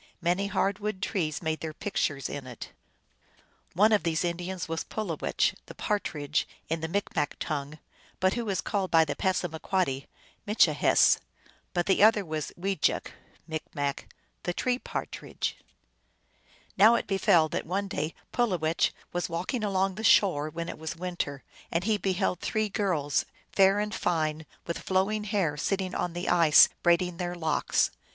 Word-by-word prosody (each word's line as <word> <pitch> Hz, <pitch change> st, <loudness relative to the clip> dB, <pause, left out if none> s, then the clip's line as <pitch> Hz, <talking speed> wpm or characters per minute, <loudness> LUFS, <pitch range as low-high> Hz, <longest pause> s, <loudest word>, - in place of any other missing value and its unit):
Many 180 Hz, +4 st, +1 dB
hard 200 Hz, 0 st, 0 dB
wood 210 Hz, -2 st, -3 dB
trees 175 Hz, -6 st, -2 dB
made 160 Hz, -1 st, -1 dB
their 155 Hz, -1 st, -5 dB
pictures 145 Hz, -9 st, -1 dB
in 140 Hz, -2 st, -6 dB
it. 125 Hz, -2 st, -9 dB, 1.0 s
One 210 Hz, +5 st, +5 dB
of 210 Hz, -, +4 dB
these 165 Hz, -1 st, 0 dB
Indians 175 Hz, +1 st, -3 dB
was 165 Hz, 0 st, -2 dB
Pulowech, 195 Hz, -8 st, -1 dB
the -, -, -10 dB
Partridge 150 Hz, -8 st, -1 dB, 0.2 s
in 165 Hz, 0 st, -1 dB
the 160 Hz, -, -2 dB
Micmac 165 Hz, -4 st, -1 dB
tongue, 145 Hz, 0 st, -3 dB, 0.4 s
but 185 Hz, +1 st, +3 dB
who 235 Hz, -3 st, -3 dB
is 195 Hz, -, 0 dB
called 195 Hz, -3 st, -1 dB
by 160 Hz, -1 st, +5 dB
the 145 Hz, -, -3 dB
Passamaquoddy 175 Hz, -5 st, -1 dB, 0.4 s
Mitchihess; 210 Hz, +2 st, +4 dB, 0.6 s
but 175 Hz, -1 st, +1 dB
the 190 Hz, -, +2 dB
other 215 Hz, -1 st, +6 dB
was 155 Hz, -2 st, -4 dB
Wejek 195 Hz, -2 st, 0 dB, 0.4 s
(M.), 145 Hz, -3 st, -3 dB, 0.5 s
the 175 Hz, -, -2 dB
Tree 250 Hz, -1 st, 0 dB
Partridge. -, -, -4 dB, 1.2 s
Now 220 Hz, +4 st, +7 dB
it -, -, -1 dB
befell 195 Hz, -4 st, +4 dB
that -, -, -3 dB
one 195 Hz, +3 st, -1 dB
day 155 Hz, -3 st, -3 dB, 0.2 s
Pulowech 180 Hz, -10 st, +1 dB, 0.2 s
was 175 Hz, 0 st, -1 dB
walking 185 Hz, +8 st, -2 dB
along 195 Hz, -1 st, +1 dB
the 215 Hz, +4 st, -7 dB
shore, 170 Hz, -9 st, +4 dB
when 170 Hz, +1 st, -5 dB
it 170 Hz, -, -6 dB
was 160 Hz, +1 st, -5 dB
winter, 170 Hz, -6 st, -4 dB, 0.3 s
and 170 Hz, +1 st, 0 dB
he 215 Hz, +1 st, +2 dB
beheld 190 Hz, -1 st, 0 dB
three 215 Hz, -1 st, -1 dB
girls, 170 Hz, -, 0 dB, 0.3 s
fair 195 Hz, +1 st, +5 dB
and 210 Hz, +1 st, -2 dB
fine, 155 Hz, -2 st, -1 dB, 0.2 s
with 170 Hz, -, -3 dB
flowing 200 Hz, +3 st, 0 dB
hair, 195 Hz, -8 st, 0 dB
sitting 190 Hz, +3 st, -1 dB
on 175 Hz, -, -2 dB
the 175 Hz, +1 st, -4 dB
ice 165 Hz, -4 st, +7 dB
braiding 175 Hz, 0 st, +2 dB
their 175 Hz, -1 st, -3 dB
locks. 160 Hz, -3 st, +1 dB
180 Hz, 155 wpm, -28 LUFS, 160-200 Hz, 1.2 s, Now